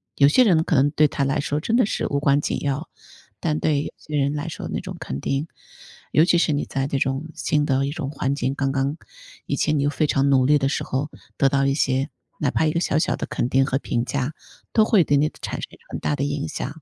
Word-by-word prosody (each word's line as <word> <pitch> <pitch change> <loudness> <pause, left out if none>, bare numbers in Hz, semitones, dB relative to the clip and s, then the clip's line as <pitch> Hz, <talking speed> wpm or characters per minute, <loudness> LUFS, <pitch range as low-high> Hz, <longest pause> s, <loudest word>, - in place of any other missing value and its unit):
有 140 - +6
些 205 - +5
人 175 -8 +4
可 - - 0
能 140 +2 +4
对 155 0 +4
他 140 - -2
来 135 +2 0
说 145 +1 -1
真 220 +9 0
的 245 -4 +4
是 - - -2
无 140 - 0
关 140 0 +3
紧 - - -2
要， 145 +3 -2 0.5
但 155 -2 -1
对 150 -3 +1
有 - - -5
些 150 - -7
人 140 0 +1
来 150 +3 -3
说 165 - -6
那 - - -2
种 - - -7
肯 65 - -5
定。 135 - -2 0.6
尤 155 - +5
其 175 -1 +3
是 160 - +2
你 145 - -1
在 135 0 -2
这 140 - -1
种 135 +3 -1
新 150 -1 +1
的 135 0 +2
一 140 - -2
种 145 -3 -4
环 140 -1 -1
境， 135 -1 -1
刚 135 -1 0
刚 140 +2 -1 0.5
以 - - -1
前 155 -1 +1
你 140 - +1
又 145 - +1
非 155 +1 0
常 140 -1 +2
努 130 -1 +5
力 150 +1 +5
的 135 -1 0
时 140 - -1
候， 140 +3 -2 0.3
得 135 - +4
到 135 0 +2
一 135 - +1
些 135 0 +1 0.3
哪 145 - +1
怕 160 - +1
一 155 - +2
个 170 - 0
小 150 - 0
小 160 - +1
的 - - -5
肯 - - -1
定 135 +1 +3
和 135 0 0
评 120 -3 -1
价， 140 +3 -2 0.4
都 220 - +5
会 215 -4 +4
对 145 -1 +2
你 150 +2 +2
产 - - -4
生 - - -6 0.2
很 - - -4
大 145 - 0
的 140 - -2
影 145 0 -2
响。 160 - -5
145 Hz, 285 characters per minute, -23 LUFS, 135-155 Hz, 0.6 s, 有